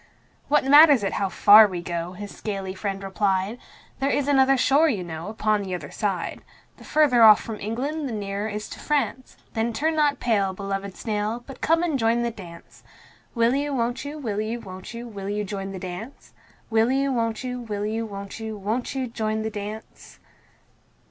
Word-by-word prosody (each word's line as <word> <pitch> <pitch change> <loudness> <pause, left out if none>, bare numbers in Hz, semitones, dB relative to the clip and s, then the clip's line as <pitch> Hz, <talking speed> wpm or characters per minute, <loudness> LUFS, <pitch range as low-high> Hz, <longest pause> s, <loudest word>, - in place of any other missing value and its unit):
"What 295 0 +3
matters 290 -3 +7
it 195 - -1
how 195 - -1
far 210 +3 +8
we 185 -3 -5
go?" 170 0 -4
his 205 +2 -8
scaly 195 -3 -4
friend 195 0 -4
replied. 195 +3 -1 0.4
"There 275 0 +1
is 285 -1 0
another 270 -1 +4
shore, 285 +5 +4
you 205 -9 -1
know, 165 0 -6
upon 215 -1 0
the 190 -2 -3
other 155 -5 -8
side. 195 -5 -3 0.4
The - - -14
further 290 -6 +3
off 215 -2 +9
from 220 -2 -7
England 275 +8 -3
the - - -5
nearer 205 0 -3
is 210 0 -5
to - - -9
France 260 -4 -2 0.2
Then 230 +1 -1
turn 315 +8 0
not 290 -3 +2
pale, 200 -5 +1
beloved 195 0 -5
snail, 215 +1 -2
but 270 -2 -11
come 330 +1 +2
and 315 -6 0
join 230 +1 +2
the 235 - -1
dance. 175 -6 -13 0.5
Will 235 +1 +3
you, 285 +1 -1
won't 240 0 -1
you, 290 +2 -6
will 215 -8 -3
you, 225 +2 -3
won't 185 -3 -9
you, 235 +1 -7
will 200 -3 -6
you 210 0 -1
join 195 -1 -5
the 195 - -6
dance? 185 +8 -8 0.4
Will 225 +2 +3
you, 275 0 +1
won't 230 -1 -1
you, 250 -1 -4
will 210 -3 -4
you, 220 +2 -2
won't 200 +1 -8
you, 220 -1 -5
won't 220 +7 -3
you 265 -1 -1
joint 220 -2 -2
the 220 - -3
dance? 210 +1 -8
220 Hz, 195 wpm, -24 LUFS, 200-255 Hz, 0.5 s, off